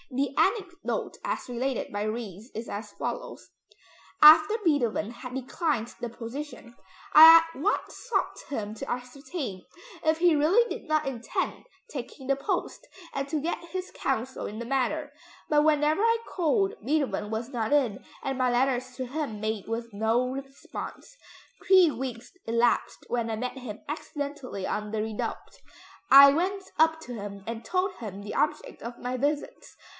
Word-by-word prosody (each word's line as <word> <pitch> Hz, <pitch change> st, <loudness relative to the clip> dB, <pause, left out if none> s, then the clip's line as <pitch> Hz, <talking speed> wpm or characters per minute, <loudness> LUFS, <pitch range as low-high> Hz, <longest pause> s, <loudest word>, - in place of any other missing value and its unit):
The 275 Hz, 0 st, -1 dB
anecdote 380 Hz, -3 st, -1 dB
as -, -, -3 dB
related 250 Hz, 0 st, -2 dB
by 205 Hz, -, -2 dB
Ries 215 Hz, -1 st, -5 dB
is 225 Hz, +2 st, -5 dB
as 210 Hz, +1 st, -6 dB
follows: -, -, -6 dB, 0.7 s
"After 310 Hz, +6 st, +9 dB
Beethoven 240 Hz, -, +1 dB
had 250 Hz, +1 st, -9 dB
declined 265 Hz, -2 st, -2 dB
the 240 Hz, -, -3 dB
position, 240 Hz, +1 st, -8 dB, 0.4 s
I 320 Hz, +1 st, +12 dB
at 330 Hz, -4 st, -1 dB
once 410 Hz, -, 0 dB
sought -, -, 0 dB
him 215 Hz, -7 st, -3 dB
to 220 Hz, -, -6 dB
ascertain 250 Hz, -, -5 dB, 0.4 s
if 315 Hz, 0 st, +3 dB
he 340 Hz, -1 st, +4 dB
really 360 Hz, +12 st, +4 dB
did -, -, -6 dB
not 310 Hz, 0 st, +2 dB
intend 245 Hz, -4 st, -3 dB, 0.3 s
taking 260 Hz, 0 st, -7 dB
the 275 Hz, -, +3 dB
post, 275 Hz, -, -3 dB, 0.3 s
and 275 Hz, 0 st, -3 dB
to 310 Hz, -, 0 dB
get 325 Hz, +4 st, -2 dB
his 370 Hz, +1 st, -4 dB
counsel 260 Hz, 0 st, -2 dB
in 210 Hz, -, -7 dB
the 235 Hz, -, -5 dB
matter. 275 Hz, +4 st, -1 dB, 0.4 s
But 295 Hz, -1 st, +4 dB
whenever 305 Hz, +3 st, +3 dB
I 460 Hz, +1 st, +4 dB
called, 385 Hz, +3 st, +1 dB
Beethoven 280 Hz, -7 st, 0 dB
was 225 Hz, +3 st, -3 dB
not 235 Hz, -3 st, -2 dB
in, 260 Hz, -9 st, +2 dB, 0.2 s
and 270 Hz, -1 st, -2 dB
my 255 Hz, -1 st, +2 dB
letters 255 Hz, 0 st, 0 dB
to 260 Hz, -, -3 dB
him 270 Hz, -5 st, -4 dB
met 215 Hz, -1 st, -3 dB
with 230 Hz, 0 st, -4 dB
no 225 Hz, +4 st, +1 dB
response. 275 Hz, -, -8 dB, 0.5 s
Three 375 Hz, -3 st, +7 dB
weeks 245 Hz, -3 st, -6 dB
elapsed 230 Hz, +1 st, +1 dB
when 235 Hz, -1 st, -1 dB
I 220 Hz, -, -1 dB
met 250 Hz, +3 st, -4 dB
him 220 Hz, -5 st, -8 dB
accidentally 285 Hz, -8 st, -5 dB
on 210 Hz, 0 st, -3 dB
the 220 Hz, -, -2 dB
Redoubte; 220 Hz, -1 st, -5 dB, 0.5 s
I 275 Hz, +1 st, +10 dB
went 380 Hz, +5 st, -1 dB, 0.2 s
up 320 Hz, 0 st, +4 dB
to 250 Hz, -, -8 dB
him 200 Hz, -3 st, -7 dB
and 230 Hz, 0 st, -5 dB
told 370 Hz, +1 st, 0 dB
him 200 Hz, -3 st, -7 dB
the 205 Hz, -, -6 dB
object 300 Hz, 0 st, -1 dB
of 235 Hz, +1 st, -7 dB
my 250 Hz, +1 st, -3 dB
visits. 285 Hz, +3 st, -3 dB
265 Hz, 160 wpm, -27 LUFS, 230-310 Hz, 0.7 s, I